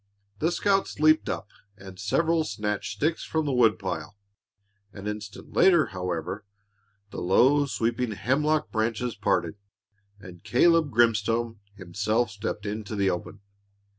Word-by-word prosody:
The 165 +6 +1
scouts 195 -1 0
leaped 155 +1 +4
up 95 - -3 0.3
and 95 -1 -12
several 160 +10 +1
snatched 105 -5 -3
sticks 160 +3 -1
from 160 -1 -1
the 145 - 0
woodpile. 100 -5 0 0.7
An 100 +1 -10
instant 105 -1 -7
later, 170 -5 +5
however, 90 +2 -4 0.7
the - - -6
low, 130 +11 +4
sweeping 115 -2 -1
hemlock 150 +8 0
branches 115 +2 -1
parted, 105 - -1 0.6
and 90 -3 -12
Caleb 165 +4 +3
Grimstone 115 -1 +1 0.2
himself 105 +5 -1
stepped 105 +1 -5
into 105 +1 -4
the 100 -2 +2
open. 95 +3 -6
110 Hz, 125 wpm, -26 LUFS, 100-140 Hz, 0.7 s, later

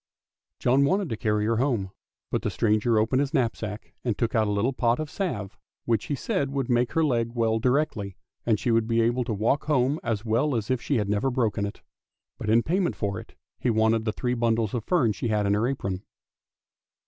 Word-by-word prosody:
John 130 +3 +3
wanted 190 +4 +1
to 115 - -1
carry 105 -1 0
her 115 +1 +1
home, 115 -7 0 0.4
but - - 0
the - - -1
stranger 110 +1 +2
opened 110 +4 +2
his 140 +2 0
knapsack, 110 -4 -2
and 120 -5 -1
took 115 - 0
out 110 -3 +2
a - - 0
little 105 +6 +1
pot 120 0 +1
of 155 -1 -4
salve, 105 - -4 0.3
which 115 -3 +1
he 145 - -2
said 140 +1 -1
would 135 -3 -2
make 120 0 +2
her 165 - +2
leg 120 -5 0
well 115 -1 +1
directly, 120 -7 0 0.3
and 110 -3 +2
she 120 - 0
would 115 -1 +2
be 115 0 +1
able 120 +2 +2
to - - -3
walk 115 +8 +1
home 145 0 +2
as 115 -2 -2
well 120 +6 +1
as 115 +2 -2
if 130 -2 0
she 140 - 0
had 105 -2 0
never 105 +6 +1
broken 110 -5 0
it. 100 - -10 0.6
But - - -3
in 115 +2 +4
payment 180 +2 0
for 100 -3 -2
it - - -13 0.2
he 125 - 0
wanted 110 0 +2
the 110 - +1
three 125 +2 -2
bundles 115 -3 +1
of 120 -3 -2
fern 145 -12 +3
she 110 - -3
had 105 -2 +1
in 100 - +2
her 105 +3 +2
apron. 100 -9 -3
115 Hz, 220 wpm, -26 LUFS, 110-130 Hz, 0.6 s, in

